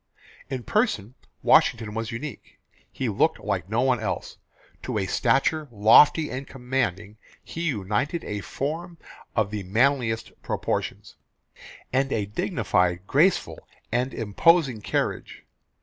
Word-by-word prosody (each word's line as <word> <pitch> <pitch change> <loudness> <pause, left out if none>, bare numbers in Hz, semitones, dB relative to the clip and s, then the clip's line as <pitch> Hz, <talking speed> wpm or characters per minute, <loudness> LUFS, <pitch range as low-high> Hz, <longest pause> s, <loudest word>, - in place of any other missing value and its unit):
In 130 -3 -4
person 130 - 0 0.3
Washington 110 -2 +4
was 115 +1 -3
unique. 125 +2 -8 0.3
He - - -3
looked - - +2
like 90 - -3
no 115 +2 +1
one 130 -2 +2
else. 105 -3 -4 0.4
To - - -3
a 95 - 0
stature 135 +9 +1
lofty 120 +8 +5
and 130 +2 -5
commanding 115 -6 -3 0.3
he 165 - -7
united 110 - -1
a 105 0 -4
form 165 - -4 0.4
of 110 -3 +1
the 105 -1 -3
manliest 115 +3 +1
proportions, - - -3 0.8
and 135 +1 +1
a 105 - 0
dignifed, 90 -2 0
graceful, 160 - +1 0.2
and 125 +3 0
imposing 125 - +2
carriage. - - -3
120 Hz, 120 wpm, -25 LUFS, 105-140 Hz, 0.8 s, lofty